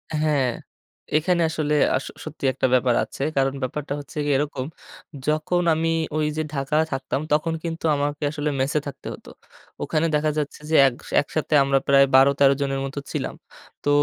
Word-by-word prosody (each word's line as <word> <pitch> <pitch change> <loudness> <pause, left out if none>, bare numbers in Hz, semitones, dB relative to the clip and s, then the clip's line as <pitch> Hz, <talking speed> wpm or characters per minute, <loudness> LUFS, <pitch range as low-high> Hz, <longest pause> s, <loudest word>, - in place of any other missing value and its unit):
হ্যাঁ, 150 -4 +2 0.7
এখানে 175 +2 +1
আসলে 155 -2 -1 0.2
আস 130 - -2 0.2
সত্যি 140 - -6
একটা 130 - +1
ব্যাপার 125 -1 +3
আছে। - - -9 0.2
কারণ 135 0 +2
ব্যাপারটা 140 +3 -3
হচ্ছে 145 +2 -11
গিয়ে 145 -2 +2
এরকম, 140 -3 -2 0.6
যখন 155 +4 +1
আমি 165 +1 0 0.3
ঐ - - 0 0.2
যে 155 - 0
ঢাকায় 150 +3 +1
থাকতাম, 135 +1 -2
তখন 155 +2 +2
কিন্তু 165 -1 -4
আমাকে 145 +1 -2
আসলে 150 0 -2
মেসে 135 +3 +1
থাকতে 140 -1 -8
হত। - - -13 0.6
ওখানে 155 +1 0
দেখা 150 +1 +1
যাচ্ছে 150 -2 -3
যে, 160 - +2
এগ 125 - -2 0.3
একসাথে 155 +2 -3
আমরা 135 0 +2
প্রায় 140 0 +6
১২ 135 +1 +7
১৩ 140 -1 +6
জনের 135 -1 -1
মতো 135 +1 -5
ছিলাম। - - -3 0.5
তো - - 0
145 Hz, 170 wpm, -23 LUFS, 135-155 Hz, 0.7 s, ১২